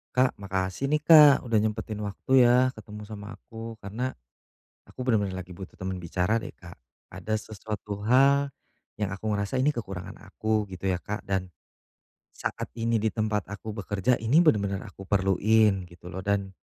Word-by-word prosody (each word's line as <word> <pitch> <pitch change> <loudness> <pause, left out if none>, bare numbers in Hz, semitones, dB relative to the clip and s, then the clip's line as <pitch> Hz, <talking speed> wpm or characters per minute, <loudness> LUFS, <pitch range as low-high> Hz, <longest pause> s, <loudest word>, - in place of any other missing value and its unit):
Kak, 130 0 +3
makasih, 95 +6 -2
nih, 150 - +3
Kak. 150 -4 +9
Udah 115 - 0
nyempetin 110 0 0
waktu, 125 +6 +3
ya, 125 +2 +5
ketemu 105 -1 -10
sama 105 -1 -8
aku, 115 -1 -9
karena 110 +6 -3 0.7
aku - - -14
benar-benar 105 -7 0
lagi 90 -1 -10
butuh 95 0 -9
temen 95 0 -3
bicara, 90 +4 0
deh, 115 - -4
Kak. 85 -1 -13 0.3
Ada 110 - -6
sesuatu 105 -1 -6
hal 140 +4 +4 0.5
yang 105 - 0
aku 100 +3 -7
merasa 100 +4 -1
ini 135 +4 +3
kekurangan 95 -8 -6
aku, 110 -1 -2
gitu, 95 0 -9
ya, 95 -2 0
Kak, 105 +3 -5
dan 95 -1 -2 0.8
saat - - -5
ini 115 -1 +1
di 110 - +2
tempat 105 -3 -2
aku 105 +1 -6
bekerja, 105 +3 0
ini 120 +8 +4
benar-benar 100 - +2
aku - - -11
perluin, 100 +1 +3
gitu, 85 0 -15
loh, 95 +1 -6
dan 100 -1 -1
105 Hz, 165 wpm, -27 LUFS, 95-115 Hz, 0.8 s, Kak